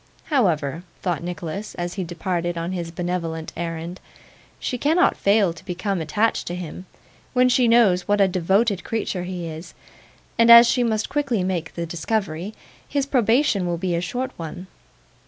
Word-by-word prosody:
'However,' 165 - +1 0.2
thought 175 -4 -1
Nicholas 175 +4 -5
as 175 0 -4
he 190 - -3
departed 175 0 -3
on 165 +2 -3
his 175 -3 -4
benevolent 165 -2 -4
errand; 170 +1 -5 0.6
'she 250 - -3
cannot 325 +7 +3
fail 200 -3 +3
to 165 - -14
become 180 +1 -2
attached 205 +9 0
to 175 - -3
him, 180 +1 -7 0.5
when 250 0 +4
she 250 -1 +3
knows 215 -6 +4
what 205 0 +2
a 195 - +5
devoted 190 +3 +1
creature 205 -5 -3
he 180 -1 -5
is, 160 +2 -9 0.6
and 230 0 +5
as 235 0 +11
she 245 +1 +2
must 220 -2 0
quickly 275 -9 0
make 180 -3 -3
the 170 - -3
discovery, 175 +2 -3 0.3
his 280 -1 0
probation 235 -6 +2
will 170 -1 -1
be 180 +1 -2
a 170 - 0
short 250 +8 -3
one. 170 +2 -7
180 Hz, 165 wpm, -23 LUFS, 170-225 Hz, 0.6 s, as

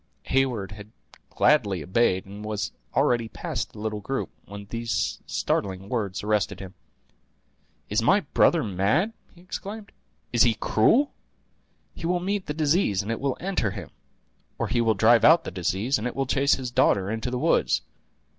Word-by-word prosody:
Heyward 125 -7 0
had 105 +1 -11 0.4
gladly 100 - +2
obeyed, 95 +1 +1
and 100 +2 -10
was 105 -5 -3 0.2
already 120 -2 +2
past - - -5
the - - -13
little 105 0 -3
group, 135 +7 -3
when 100 0 -9
these 115 0 -2
startling 95 0 -2
words 105 -6 -2
arrested 105 0 0
him. 95 -1 -9 1.1
"Is 105 +2 +1
my 195 - +4
brother 170 -4 +3
mad?" 110 - +1 0.2
he 175 - -17
exclaimed; 205 +3 -7 0.4
"is 120 - +3
he 120 -3 +5
cruel? 235 - +3 0.8
He 165 - -5
will 180 0 +1
meet 195 +2 -2
the 150 - -2
disease, 150 - +2
and 105 - -4
it 115 - -2
will 135 -2 -1
enter 185 - -1
him; - - -8 0.7
or - - -2
he 120 - +1
will 110 -2 +2
drive 115 +3 +5
out 165 +2 +7
the - - -6
disease, 95 - 0
and 115 - -2
it 125 - -5
will 135 - 0
chase 140 +2 +3
his 130 -2 -5
daughter 100 -6 +2
into 115 +2 -3
the 125 - -2
woods. - - +2
115 Hz, 170 wpm, -25 LUFS, 100-140 Hz, 1.1 s, out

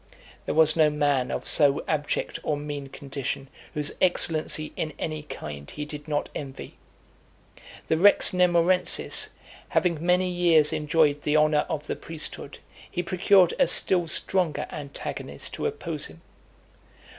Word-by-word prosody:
There - - -2
was 155 -1 +4
no 155 -2 +4
man 145 -4 0
of - - -4
so 145 -2 +3
abject 150 -2 -2
or 150 - -1
mean 145 -1 -6
condition, 135 -1 -6 0.3
whose 150 -1 -1
excellency 155 -3 +3
in 155 -2 -4
any 155 -1 -4
kind 75 - -8
he 150 - -6
did 150 0 -9
not 145 -1 -1
envy. 135 -2 -8 1.1
The 160 - +1
Rex 205 +5 +5
Nemorensis 180 0 +2 0.4
having 170 -3 0
many 180 +1 +2
years 170 -4 +3
enjoyed 150 -1 +1
the 150 +1 +1
honour 150 -1 +2
of 155 -3 -3
the - - -3
priesthood, 155 -3 -6 0.3
he 175 - -3
procured 185 0 +3
a - - +4
still 175 -3 +3
stronger 175 0 0
antagonist 140 -2 -6
to - - -2
oppose 170 - -5
him. 80 +1 -16
155 Hz, 140 wpm, -25 LUFS, 145-170 Hz, 1.1 s, Rex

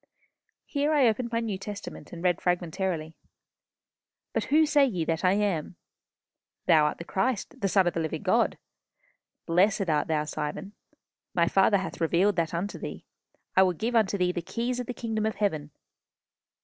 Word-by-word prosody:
Here 290 +1 0
I 280 -5 +5
opened 235 +2 0
my 230 0 0
New 210 -5 -3
Testament, 205 0 -8
and 170 0 -8
read 175 -2 +2
fragmentarily, 175 -2 -1 1.2
"'But - - 0
whom 315 +2 +4
say 295 -1 +4
ye 185 -12 0
that 165 +2 -1
I 185 0 +4
am?... 195 -5 -1 0.9
Thou 160 -4 +5
art 150 - -1
the - - -7
Christ, 205 +5 -2
the 200 - +2
Son 190 -1 +3
of 175 - +1
the - - -2
living 160 -1 -3
God.... - - +2 0.9
Blessed 185 +1 +2
art 150 -1 +1
thou, 155 -1 +1
Simon.... 150 +6 -5 0.6
My 170 -1 +3
Father 195 +3 +4
hath 190 -2 -5
revealed 180 +5 +3
that 165 -1 +1
unto 180 +5 -3
thee. - - -7 0.5
I 190 - +7
will 185 -1 +4
give 225 +7 -2
unto 210 -3 +3
thee 180 -1 +2
the 175 - -3
keys 240 +7 -3
of 245 - -4
the 250 - -3
kingdom 220 -2 -2
of 220 - -2
heaven.... 155 -8 -1
190 Hz, 175 wpm, -27 LUFS, 170-220 Hz, 1.2 s, I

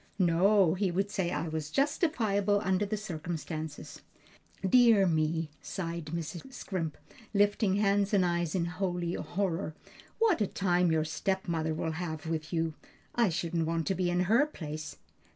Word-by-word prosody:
"No, 185 0 +4
he 190 +1 0
would 195 +3 -1
say 190 -4 0
it 165 -2 -2
was 155 -2 -3
justifiable 220 - +1
under 190 +2 +1
the 215 +1 -2
circumstances." 160 -5 -5 0.7
"Dear 230 -2 +6
me!" 160 -1 0
sighed 170 -3 -4
Mrs. 170 - -5
Scrimp, 170 -9 -4 0.4
lifting 205 -1 +3
hands 200 0 +2
and 195 -4 +4
eyes 170 -1 0
in 175 -2 +1
holy 175 -1 -2
horror, 180 -5 -2 0.4
"what 440 - +3
a 205 - +2
time 180 -3 +2
your 160 -1 +2
stepmother 160 -1 -1
will 160 +1 -2
have 160 -2 -4
with 160 -1 -3
you! 165 -1 0 0.4
I 235 -4 +3
shouldn't 165 -1 -1
want 165 -1 -1
to 195 - +1
be 185 -1 0
in 175 0 +1
her 230 +11 +4
place." 155 - -7
175 Hz, 150 wpm, -30 LUFS, 160-200 Hz, 0.7 s, Dear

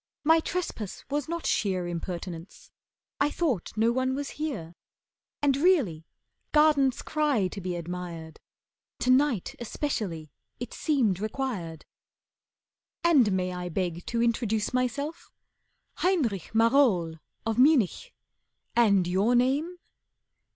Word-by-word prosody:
My 320 +2 +5
trespass 320 - -4
was 290 +1 -1
not 335 0 -3
sheer 185 -3 0
Impertinence. 175 0 -6 0.5
I 285 - +3
thought 265 - -2
no 225 +2 +3
one 260 +1 0
was 285 0 -4
here, 175 - -4 0.7
And 280 -2 +4
really 275 - +2 0.5
gardens 295 -4 +4
cry 290 -10 +1
to 195 - -7
be 180 -1 -3
admired. 170 -2 -6 0.6
To 255 - +3
night 255 -6 +2
especially 210 - -3 0.3
it 245 - -6
seemed 240 - +1
required. 210 - -4 1.2
And 285 -11 +5
may 185 -1 -1
I 180 0 -4
beg 175 0 -2
to 235 0 0
introduce 220 -2 0
myself? 280 +6 -2 0.7
Heinrich 270 - 0
Marohl 225 - +3 0.3
of 225 +1 -1
Munich. 285 - +3 0.6
And 200 -6 +4
your 195 +7 +2
name?" 280 +8 +1
230 Hz, 115 wpm, -27 LUFS, 180-285 Hz, 1.2 s, My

